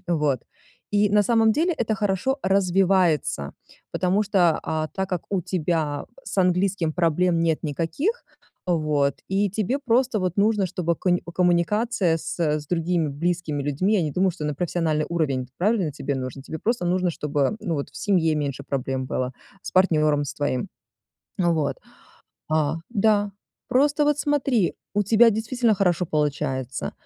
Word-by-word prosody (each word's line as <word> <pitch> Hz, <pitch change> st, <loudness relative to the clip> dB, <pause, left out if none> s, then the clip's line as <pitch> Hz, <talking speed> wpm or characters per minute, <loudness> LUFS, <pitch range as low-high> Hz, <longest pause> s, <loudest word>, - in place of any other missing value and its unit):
Вот, 150 Hz, -7 st, +1 dB, 0.5 s
и 205 Hz, 0 st, +3 dB
на 210 Hz, 0 st, +4 dB
самом 225 Hz, 0 st, +3 dB
деле 335 Hz, +8 st, +1 dB
это 225 Hz, -7 st, -1 dB
хорошо 210 Hz, +6 st, 0 dB
развивается, 185 Hz, -, +2 dB, 0.4 s
потому 190 Hz, +3 st, +1 dB
что, 185 Hz, -5 st, +2 dB
а, 155 Hz, 0 st, -2 dB
так 190 Hz, 0 st, -2 dB
как 180 Hz, -3 st, -2 dB
у 195 Hz, -3 st, 0 dB
тебя 160 Hz, -4 st, -1 dB, 0.2 s
с -, -, -5 dB
английским 180 Hz, -2 st, +1 dB
проблем 170 Hz, +1 st, +1 dB
нет 165 Hz, -2 st, +1 dB
никаких, 165 Hz, -, -1 dB, 0.4 s
вот, 150 Hz, -5 st, +1 dB
и 195 Hz, +1 st, +1 dB
тебе 215 Hz, +7 st, -1 dB
просто 240 Hz, -3 st, +2 dB
вот 185 Hz, 0 st, -2 dB
нужно, 210 Hz, 0 st, +3 dB
чтобы 170 Hz, -1 st, -1 dB
конь 180 Hz, -1 st, +1 dB, 0.2 s
коммуникация 180 Hz, +1 st, +2 dB
с, 160 Hz, +2 st, -6 dB
э, 150 Hz, -2 st, +1 dB
с 150 Hz, -, -13 dB
другими 165 Hz, -1 st, 0 dB
близкими 160 Hz, 0 st, -2 dB
людьми- 145 Hz, +8 st, 0 dB
я 195 Hz, -, +2 dB
не 150 Hz, -3 st, -2 dB
думаю, 185 Hz, +3 st, +2 dB
что 165 Hz, -3 st, -7 dB
на 150 Hz, -1 st, -1 dB
профессиональный 160 Hz, -2 st, -1 dB
уровень, 140 Hz, -7 st, -1 dB
правильно, 195 Hz, -3 st, +1 dB
тебе 140 Hz, 0 st, -3 dB
нужно? 130 Hz, +1 st, -5 dB
Тебе 160 Hz, +3 st, -6 dB
просто 230 Hz, -6 st, -1 dB
нужно, 180 Hz, 0 st, +1 dB
чтобы, 150 Hz, +4 st, -1 dB
ну, 175 Hz, -6 st, -2 dB
вот 140 Hz, -, -4 dB
в -, -, -15 dB
семье 165 Hz, -6 st, +1 dB
меньше 140 Hz, -2 st, -3 dB
проблем 135 Hz, -1 st, -2 dB
было, 130 Hz, 0 st, -2 dB, 0.3 s
с -, -, -7 dB
партнером 155 Hz, -6 st, +3 dB
с -, -, -5 dB
твоим. 145 Hz, +3 st, -2 dB, 0.7 s
Ну, 175 Hz, -2 st, +2 dB
вот, 145 Hz, -4 st, -1 dB, 0.7 s
а, 155 Hz, -1 st, +1 dB, 0.2 s
да, 205 Hz, -2 st, +2 dB, 0.4 s
просто 290 Hz, +3 st, +3 dB
вот 295 Hz, 0 st, +2 dB
смотри, 275 Hz, -9 st, +1 dB, 0.2 s
у 205 Hz, -, +3 dB
тебя 225 Hz, +3 st, +5 dB
действительно 225 Hz, +1 st, +1 dB
хорошо 180 Hz, -2 st, +1 dB
получается. 135 Hz, -, -2 dB
175 Hz, 160 wpm, -24 LUFS, 150-205 Hz, 0.7 s, тебя